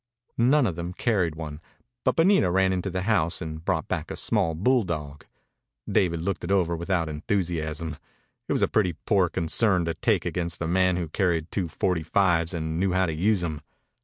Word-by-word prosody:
None 130 +4 +4
of 90 -7 -1
them 85 +1 -5
carried 90 -8 0
one, 75 -1 -7 0.4
but - - +2
Bonita 165 - +4
ran 95 +1 +2
into 95 +1 -2
the 95 0 -3
house 95 -6 +1
and 80 -1 -6
brought - - -1
back - - -3
a - - -4
small 80 -1 +1
bulldog. 85 - -1 0.6
Dave 90 -3 +2
looked 85 +4 -3
it 85 - -3
over 90 -3 +2
without 85 0 -1
enthusiasm. 80 -2 -2 0.5
It - - 0
was - - +1
a - - +4
pretty 95 -5 +1
poor 95 -5 +3
concern 90 +2 +1
to 85 - -1
take - - 0
against 85 -1 -3
a 85 - -2
man 90 +1 +2
who 85 -2 -2
carried 85 -2 0
two 95 -4 -1
forty 85 +1 -1
fives 85 0 +2
and 80 -2 -3
knew 95 0 +1
how 95 0 +3
to 80 - -2
use 95 +5 +1
them. 80 -4 -3
85 Hz, 190 wpm, -26 LUFS, 80-95 Hz, 0.6 s, None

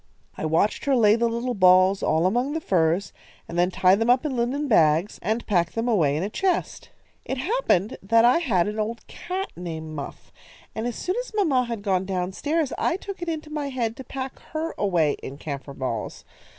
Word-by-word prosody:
I - - -4
watched 160 +7 +1
her 280 -1 +3
lay 215 -3 +5
the 235 0 +1
little 235 +2 -2
balls 185 -1 +5
all 160 +2 +2
among 245 +9 +1
the 320 - -1
furs, 180 - +1 0.3
and 170 - -7
then 175 +1 +3
tie 185 0 +4
them 225 +4 +1
up 250 +4 +4
in 280 -4 -1
linen 255 +5 -1
bags, 165 - +3
and 220 +5 -1
pack 175 -5 +1
them 225 +1 -2
away 160 -11 +2
in 160 - -1
a - - -1
chest. 375 - -1 0.3
"It 265 - -4
happened 265 - 0
that 230 +4 +4
I 250 +7 +5
had 205 - +1
an 210 +1 -4
old 225 +2 -3
cat 375 +2 -5
named 160 -3 -6
Muff, 140 -2 -8 0.4
and 220 +2 -3
as 240 - -4
soon 365 +4 -2
as - - -5
mamma 290 - +2
had 230 -4 -5
gone 190 -2 +1
down 185 -1 -2
stairs, 300 - -1
I 345 - +1
took 395 -1 -8
it 345 - -3
into 310 -1 -5
my 295 -2 -3
head 235 -4 -2
to 265 - -7
pack 265 +1 -6
her 320 +1 -2
away 170 -7 +1
in 135 - -7
camphor 140 -2 -6
balls. 115 -5 -4
225 Hz, 210 wpm, -24 LUFS, 180-270 Hz, 0.4 s, lay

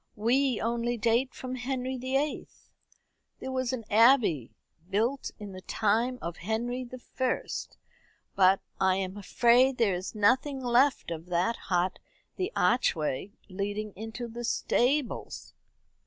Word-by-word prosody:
"We 250 +3 +2
only 235 +1 -1
date 235 +3 +2
from 255 0 -6
Henry 255 0 -3
the 260 +1 -3
Eighth. 295 +1 -4 0.7
There 265 - -5
was 255 -2 -1
an 255 -3 -4
abbey, 220 - +4 0.3
built 235 +8 0
in 205 -2 -8
the 185 0 -9
time 225 +6 0
of 170 0 -4
Henry 235 +6 -2
the 255 +1 -9
First; 255 +1 -3 0.6
but 190 0 +5 0.2
I 190 -1 +3
am 190 0 -3
afraid 240 +6 +3
there 220 -5 +3
is 180 +4 -5
nothing 260 +7 +2
left 250 -3 +2
of 165 +1 -6
that 180 +6 +1
hut 180 0 0 0.4
the 370 +3 -2
archway 185 - +1
leading 205 +2 -4
into 225 +3 -6
the 235 +1 -7
stables." 250 +3 0
235 Hz, 135 wpm, -29 LUFS, 200-255 Hz, 0.7 s, but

